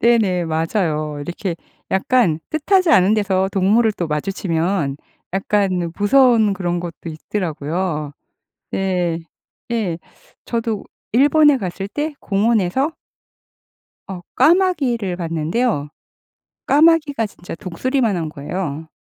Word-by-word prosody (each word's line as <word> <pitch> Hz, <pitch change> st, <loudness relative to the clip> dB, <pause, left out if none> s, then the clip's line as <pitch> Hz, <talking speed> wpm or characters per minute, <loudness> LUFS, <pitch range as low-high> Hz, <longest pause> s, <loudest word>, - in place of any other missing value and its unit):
네네 210 Hz, -7 st, +3 dB
맞아요. 160 Hz, -2 st, -1 dB
이렇게 175 Hz, +3 st, -4 dB, 0.3 s
약간 190 Hz, -4 st, +2 dB
뜻하지 360 Hz, +3 st, +2 dB
않은 205 Hz, -, +5 dB
데서 190 Hz, -2 st, +1 dB
동물을 210 Hz, +4 st, +3 dB
또 175 Hz, -4 st, -3 dB
마주치면 165 Hz, -1 st, -1 dB, 0.4 s
약간 190 Hz, -3 st, 0 dB
무서운 225 Hz, -1 st, +4 dB
그런 175 Hz, -2 st, -2 dB
것도 170 Hz, -1 st, -6 dB
있더라고요. 155 Hz, -2 st, -3 dB, 0.6 s
네. 180 Hz, -3 st, 0 dB, 0.5 s
예. 205 Hz, -8 st, -1 dB, 0.5 s
저도 230 Hz, -3 st, -2 dB, 0.3 s
일본에 290 Hz, +3 st, +5 dB
갔을 195 Hz, -1 st, -4 dB
때 295 Hz, +7 st, -3 dB
공원에서 215 Hz, -, +1 dB, 1.2 s
어 185 Hz, -2 st, -6 dB
까마귀를 280 Hz, -, +2 dB
봤는데요. 165 Hz, -, -1 dB, 0.8 s
까마귀가 300 Hz, -5 st, +4 dB
진짜 180 Hz, -4 st, -9 dB
독수리만 225 Hz, +4 st, -1 dB
한 160 Hz, -2 st, -2 dB
거예요. 155 Hz, +1 st, -5 dB
195 Hz, 240 characters per minute, -20 LUFS, 170-235 Hz, 1.2 s, 않은